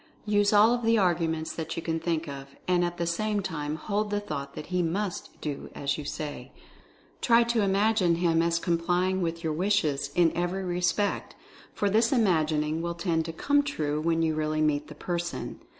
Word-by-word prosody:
Use 205 -1 +3
all 215 +3 +6
of 245 - -1
the 230 0 +3
arguments 165 -4 +1
that 160 0 -5
you 165 - -3
can 165 -1 -1
think 165 -1 -1
of, 140 -1 -7 0.2
and 180 -1 +3
at 175 0 -2
the 170 - -1
same 210 +5 0
time 155 -5 -3
hold 210 +6 -2
the 205 0 0
thought 140 -9 -6
that 150 - -6
he 180 - +2
MUST 180 +3 -3
do 145 -2 -5
as 140 0 -1
you 150 - -6
say. 150 0 -5 0.7
Try 235 -1 +5
to 235 -1 +1
imagine 200 -2 +3
him 165 -1 +2
as 170 0 +2
complying 175 +2 0
with 165 0 -2
your 160 -1 0
wishes, 155 -6 +1
in 170 -2 +3
every 175 +2 -1
respect, 180 +3 -1 0.4
for 205 - +1
this 225 +4 +3
imagining 160 - +2
will 170 0 -3
tend 170 -2 0
to 165 - -4
'come 285 - +2
true* 155 - -2
when 165 0 +1
you 160 -1 +1
really 155 0 -1
meet 150 -1 +1
the 150 - -10
person. 175 +2 -4
170 Hz, 195 wpm, -27 LUFS, 160-200 Hz, 0.7 s, all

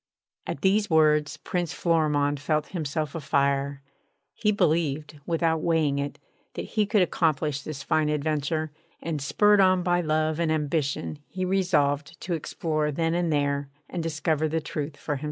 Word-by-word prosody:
At 140 - -4
these 205 +2 +2
words 150 -2 +3
Prince 175 -2 -3
Florimond 150 -4 +1
felt 150 +1 -1
himself 155 -3 -3
a 165 - -3
fire. 140 -1 0 0.5
He 210 -2 +1
believed, 155 -6 0
without 165 -1 +1
weighing 155 -4 +1
it, 140 0 -3 0.4
that - - -5
he 215 -2 +2
could 210 -3 +4
accomplish 155 -4 0
this 140 -2 -6
fine 155 -1 +1
adventure; 150 +1 -1 0.3
and, 160 -3 -3
spurred 205 +8 +4
on 185 -1 +4
by 175 0 +2
love 155 0 0
and 165 -2 +1
ambition, 150 -1 -1
he 185 0 -3
resolved 155 -6 +1
to 180 - -3
explore 155 -1 -1
then 165 +2 0
and 175 -1 0
there 140 -1 0 0.2
and 175 - -4
discover 160 -1 0
the 160 +1 0
truth 145 -1 -5
for 145 0 -3
himself. - - -9
155 Hz, 160 wpm, -26 LUFS, 145-170 Hz, 0.5 s, could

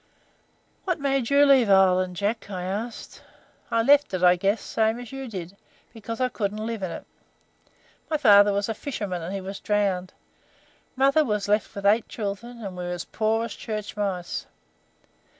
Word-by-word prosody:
"What 360 -3 -1
made 275 -4 0
you 285 +1 +5
leave 265 -6 +5
Ireland, 185 -1 +4
Jack?" 205 +3 -2
I 185 -3 -4
asked. 210 +5 -5 0.5
"I 230 - +2
left 285 +3 +5
it, 185 - -3
I 180 0 +7
guess, 195 +4 +1
same 220 +1 0
as 245 -2 -9
you 270 -1 -6
did, 185 -4 -7 0.4
because 230 +1 -7
I 255 - +2
couldn't 215 -2 -3
live 225 -2 -4
in 185 - -2
it. - - -7 1.0
My 310 - +1
father 205 -6 +6
was 200 0 -1
a 225 - -1
fisherman, 205 -8 -4
and 165 +3 -5
he 195 0 -4
was 195 +1 -7
drowned. 195 -3 -1 0.8
Mother 275 +4 +4
was 210 -6 -1
left 210 +1 0
with 200 0 -6
eight 215 +3 +3
children, 230 +3 -5
and 190 -2 -6
we 180 - -5
were - - -4
as 175 -1 -4
poor 220 +1 0
as 230 - -6
church 215 -2 -6
mice. 190 -4 -3
210 Hz, 180 wpm, -25 LUFS, 195-235 Hz, 1.0 s, I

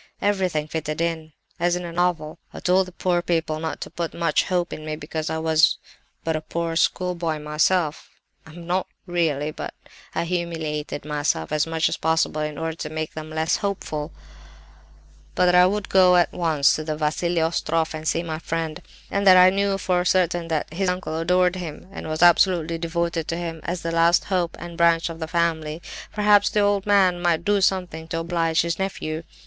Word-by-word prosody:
Everything 185 -7 0
fitted 155 -1 -4
in, 165 -2 -2 0.3
as 175 +1 +2
in 180 0 -4
a 170 - -6
novel. 170 -3 -1 0.2
I - - -6
told 185 +1 +2
the - - -10
poor 175 0 0
people 165 -3 -1
not 160 0 -4
to - - -6
put 170 -1 -4
much 165 -3 +1
hope 180 -2 -1
in 155 - -7
me, 155 0 -4
because 155 +1 -4
I 160 - -2
was 160 -1 +3 0.5
but 160 -1 -1
a 155 - -2
poor 165 +1 -3
schoolboy 170 -2 0
myself—(I 150 +1 -2
am 170 +2 -11
not 180 +2 -1 0.2
really, 160 -5 0
but - - -7 0.4
I - - 0
humiliated 165 -4 -3
myself 145 - -1
as 155 +1 +1
much 165 0 +1
as - - -2
possible 160 -1 +1
in 150 -1 -3
order 160 +1 -3
to 150 - -5
make 155 0 -4
them 155 0 -7
less 160 0 0
hopeful)—but 75 - -6
that 180 - +4
I 180 0 +7
would 205 +1 -2
go 185 -1 +5
at 175 -1 +3
once 160 -5 +2
to 155 - -4
the 155 -1 -3
Vassili 165 +3 0
Ostroff 165 0 0
and 155 0 -5
see 165 - +1
my 160 -2 -4
friend; 165 -1 -3 0.3
and 200 0 0
that 185 -1 +9
as 185 0 +8
I - - -4
knew 200 0 +1
for 180 -2 0
certain 175 -2 +1
that 160 -1 -2
his 185 +2 0
uncle 180 -3 -3
adored 180 +2 +2
him, 170 -2 -7
and 195 - -7
was 155 +2 0
absolutely 170 -2 +4
devoted 170 -1 -2
to 165 - -2
him 165 -2 -5
as 175 0 -3
the 165 - -2
last 165 +1 +4
hope 180 -4 -1
and 170 0 -9
branch 170 0 +3
of 165 0 -8
the 160 - -4
family, 160 -2 -1 0.3
perhaps 205 -1 +4
the 210 - +1
old 205 -1 +1
man 190 -3 +4
might 170 -1 +1
do 205 -1 +2
something 180 -4 0
to 165 - -3
oblige 165 -1 +1
his 170 +1 -2
nephew. 160 -5 -3
165 Hz, 200 wpm, -23 LUFS, 155-180 Hz, 0.5 s, that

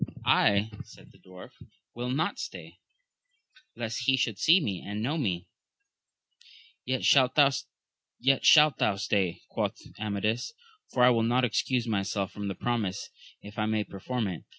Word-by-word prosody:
I, 105 +2 +3
said - - -17
the - - -22
dwarf, 95 0 -13 0.4
will 120 +1 -4
not 155 +9 -1
stay, - - -8 1.0
lest 115 +2 -4
he 135 0 +4
should 115 -6 -1
see 150 - +3
and 105 +2 -5
know 140 +6 -1
me. 95 - -2 1.4
Yet 130 0 -2
shalt 130 -2 +4
thou 145 - +7
stay, 105 - +1
quoth - - -3 0.2
Amadis, 110 - -2 0.4
for 125 - +2
I 125 - +7
will 115 -2 +2
not 120 +3 +2
excuse 125 +1 0
myself 100 -2 -2
from 105 -1 -6
the 95 - -4
promise, 105 -4 -3 0.3
if 105 +1 -9
I 110 - 0
may 110 -1 0
perform 110 +5 -4
it. 90 -4 -5
110 Hz, 140 wpm, -28 LUFS, 100-130 Hz, 1.4 s, thou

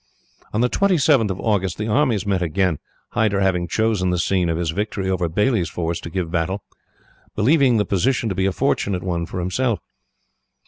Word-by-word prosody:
"On 105 - 0
the 125 - +4
27th 150 - +3
of 95 0 -3
August 95 -5 0
the 105 - -3
armies 115 -3 +1
met 95 -2 0
again, 90 -1 0 0.3
Hyder 105 -3 +1
having 90 -3 +1
chosen 110 -1 +1
the 90 - 0
scene 90 0 +1
of 80 - 0
his 85 -2 -1
victory 100 +1 -3
over 90 -2 0
Baillie's 105 +1 +1
force 85 -1 -3
to - - -8
give 85 -2 -3
battle, 90 +4 -1 0.7
believing 130 +2 +4
the 105 - +1
position 115 +6 +1
to 100 - -1
be 95 +1 0
a - - +1
fortunate 95 0 0
one 85 -2 -2
for - - -5
himself. 100 +4 0
95 Hz, 185 wpm, -21 LUFS, 90-110 Hz, 0.7 s, the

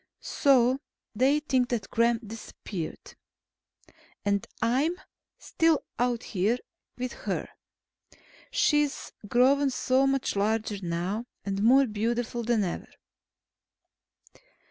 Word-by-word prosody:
So 260 -2 +3 0.3
they 270 +7 +3
think 255 -4 +1
that 220 -6 -3
Gremm 230 -1 +2
disappeared. 200 -5 -7 1.1
And 200 0 +1
I'm 290 +10 +1 0.4
still 325 -2 +1 0.2
out 245 -1 +1
here 210 +4 0 0.4
with 250 0 -3
her. - - -3 1.0
She's 295 -2 +1 0.2
grown 270 +5 +4
so 260 +1 +2
much 270 -4 0
larger 215 +1 0
now, 180 +7 -2 0.2
and 195 0 -2
more 260 +5 +6
beautiful 235 +2 -2
than 230 -2 +1
ever. 175 - -4
240 Hz, 100 wpm, -28 LUFS, 210-265 Hz, 1.1 s, more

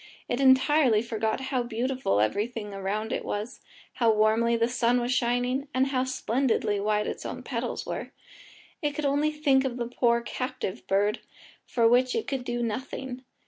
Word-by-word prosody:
It 245 - -1
entirely 260 -3 +5
forgot 220 -2 -1
how 255 -2 +1
beautiful 240 - -1
everything 210 - -1
around 200 +3 -2
it - - -2
was, 210 +5 -4 0.3
how 230 -2 +3
warmly 220 +2 +3
the 230 0 +2
sun 245 0 +2
was 245 +1 0
shining, 250 +3 0
and 260 +1 +3
how 260 -1 0
splendidly 260 -4 0
white 210 +1 +1
its - - -4
own - - -6
petals - - -3
were. - - -4 0.7
It 295 -2 -1
could 305 - -2
only 285 +2 +2
think 285 -3 +2
of 255 -2 -3
the 240 - -2
poor 235 0 +1
captive 250 - -5
bird, 205 +3 +1 0.5
for 230 -2 +3
which 250 +2 +3
it 445 - -1
could 270 -3 -3
do 240 -1 -2
nothing. 250 +2 -4
240 Hz, 170 wpm, -27 LUFS, 220-260 Hz, 0.7 s, entirely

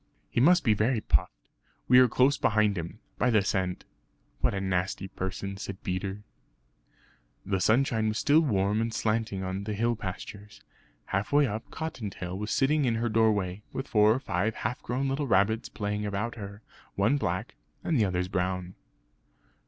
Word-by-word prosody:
"He 120 - +1
must 180 +6 +5
be 110 - +4
very 110 +3 +1
puffed; 75 -8 +1 0.6
we 125 0 +7
are 130 - +7
close 130 +4 +3
behind 105 -4 +2
him, 85 +3 -5 0.2
by 125 - +3
the 110 -4 +3
scent. 95 -2 -1 0.5
What - - +1
a - - -1
nasty 95 0 -1
person!" 95 +1 -5
said 100 0 -7
Peter. 95 +2 -3 1.2
The 95 -1 -1
sunshine 110 +1 +2
was 110 0 -1
still 150 +4 +4
warm 105 -6 +1
and 115 0 -1
slanting 110 -3 -1
on 95 +2 -4
the 105 -1 -3
hill 115 +3 +1
pastures. 105 +1 -8 0.4
Half 100 +3 -2
way 145 0 +5
up, 110 -1 -4
Cottontail 105 - -5
was 105 +2 -4
sitting 145 +3 +2
in 115 -2 +1
her 115 +1 0
doorway, 105 -4 +1
with 135 +1 -4
four 105 -1 +4
or - - -2
five 105 -3 -1
half 110 +3 -3
grown 130 +3 -2
little 135 +1 -1
rabbits 110 +2 +2
playing 105 0 -3
about 105 +4 -2
her; 100 -1 -9 0.3
one 110 +9 +2
black 90 -9 -2 0.3
and 165 - 0
the 115 -6 +3
others 90 -1 -1
brown. 90 0 -2
105 Hz, 170 wpm, -28 LUFS, 95-120 Hz, 1.2 s, we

